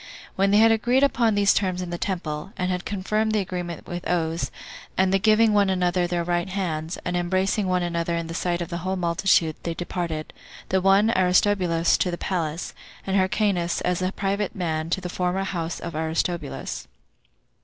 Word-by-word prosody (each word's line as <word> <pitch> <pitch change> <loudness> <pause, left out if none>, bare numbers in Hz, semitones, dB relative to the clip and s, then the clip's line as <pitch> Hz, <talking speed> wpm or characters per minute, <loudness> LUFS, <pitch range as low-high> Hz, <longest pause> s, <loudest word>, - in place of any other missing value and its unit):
When 195 +1 +2
they 205 - +4
had 225 +1 +6
agreed 240 +4 +2
upon 235 -6 +3
these 200 -1 +4
terms 185 -3 0
in 180 -1 -4
the 175 - -2
temple, 170 -2 -3
and 185 0 -1
had 180 0 -3
confirmed 215 +3 -1
the 215 - +2
agreement 180 -3 -4
with 175 0 -5
oaths, 165 -1 0 0.5
and 190 0 +3
the 195 - +4
giving 215 +1 +4
one 200 -1 +4
another 180 -1 +1
their 175 -1 -1
right 175 +1 -1
hands, 170 -4 -3
and 180 - -1
embracing 185 +3 0
one 180 -1 +1
another 170 0 -1
in 170 - -3
the 165 - -6
sight 175 0 -1
of 170 - -9
the 170 - -3
whole 185 +2 -2
multitude, 170 -2 +2
they 170 -1 -3
departed; 170 -3 -4 0.4
the 190 0 +2
one, 195 +4 +4
Aristobulus, 180 -2 +3
to 180 - +1
the 175 - -3
palace; 170 -3 -3 0.3
and 195 - -1
Hyrcanus, 190 -2 +1
as 180 0 0
a 185 +1 0
private 200 0 -2
man, 160 -3 -2
to 190 - 0
the 180 - -4
former 180 +2 -1
house 170 -3 -3
of 170 - -6
Aristobulus. 160 -1 -3
180 Hz, 190 wpm, -24 LUFS, 170-195 Hz, 0.5 s, had